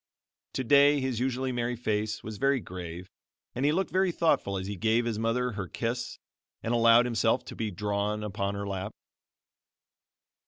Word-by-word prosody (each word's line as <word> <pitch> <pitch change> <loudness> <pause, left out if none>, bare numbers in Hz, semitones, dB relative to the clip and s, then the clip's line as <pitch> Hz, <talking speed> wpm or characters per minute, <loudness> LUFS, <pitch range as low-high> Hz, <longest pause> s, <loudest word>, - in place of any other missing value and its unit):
Today 140 +3 +5
his 130 -3 -2
usually 130 +1 -1
merry 120 0 -1
face 110 -2 -2
was 110 -1 -7
very 135 0 +3
grave 90 -3 -7 0.5
and 130 +3 -1
he 145 - +4
looked 190 +4 0
very 185 0 +2
thoughtful 160 - +1
as 95 - -4
he 100 +1 -4
gave 115 +5 +1
his 115 -2 -2
mother 125 +2 0
her 100 -4 -5
kiss 120 +5 -3 0.5
and 115 - -1
allowed 115 0 +6
himself 115 -2 +1
to - - -8
be 110 -1 -2
drawn 105 +2 -2
upon 100 -1 -2
her 100 0 -4
lap. 95 -1 -4
115 Hz, 165 wpm, -28 LUFS, 100-125 Hz, 0.5 s, allowed